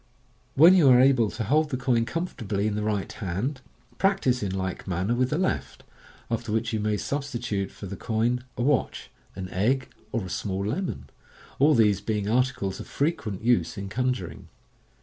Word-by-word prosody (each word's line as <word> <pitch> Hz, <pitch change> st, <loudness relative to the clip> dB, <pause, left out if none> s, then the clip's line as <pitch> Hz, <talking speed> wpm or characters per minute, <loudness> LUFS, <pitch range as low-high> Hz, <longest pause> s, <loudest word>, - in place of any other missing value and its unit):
When 165 Hz, +6 st, +8 dB
you 170 Hz, -8 st, +6 dB
are 125 Hz, -1 st, +7 dB
able 130 Hz, -4 st, +4 dB
to 110 Hz, -, -4 dB
hold 150 Hz, +8 st, +2 dB
the 130 Hz, -, -2 dB
coin 125 Hz, -2 st, +1 dB
comfortably 115 Hz, -, -3 dB
in 110 Hz, -, 0 dB
the 105 Hz, -, -2 dB
right 105 Hz, -2 st, -1 dB
hand, 110 Hz, +7 st, -3 dB, 0.4 s
practise 135 Hz, -11 st, +2 dB
in 100 Hz, -, -1 dB
like 95 Hz, -1 st, -4 dB
manner 95 Hz, +5 st, 0 dB
with 125 Hz, +1 st, +1 dB
the 150 Hz, -, 0 dB
left, 185 Hz, +1 st, -2 dB, 0.5 s
after 115 Hz, -1 st, -2 dB
which 110 Hz, +1 st, -1 dB
you 110 Hz, -, 0 dB
may 105 Hz, 0 st, 0 dB
substitute 120 Hz, -7 st, -3 dB
for -, -, -10 dB
the 100 Hz, +1 st, -6 dB
coin 120 Hz, +3 st, 0 dB
a 120 Hz, -, -1 dB
watch, 145 Hz, +1 st, 0 dB, 0.2 s
an 95 Hz, 0 st, -5 dB
egg, 125 Hz, +9 st, 0 dB, 0.2 s
or 115 Hz, -5 st, -2 dB
a -, -, -7 dB
small 95 Hz, +2 st, -2 dB
lemon 160 Hz, -, -3 dB, 0.3 s
— -, -, -23 dB
all 150 Hz, +3 st, +5 dB
these 105 Hz, -4 st, +3 dB
being 105 Hz, -1 st, -2 dB
articles 120 Hz, -4 st, 0 dB
of -, -, -8 dB
frtquent 140 Hz, -, -2 dB
use 115 Hz, -9 st, +2 dB
in 100 Hz, 0 st, -5 dB
con 125 Hz, +5 st, +1 dB
juring. 95 Hz, -9 st, -6 dB
115 Hz, 190 wpm, -26 LUFS, 100-130 Hz, 0.5 s, When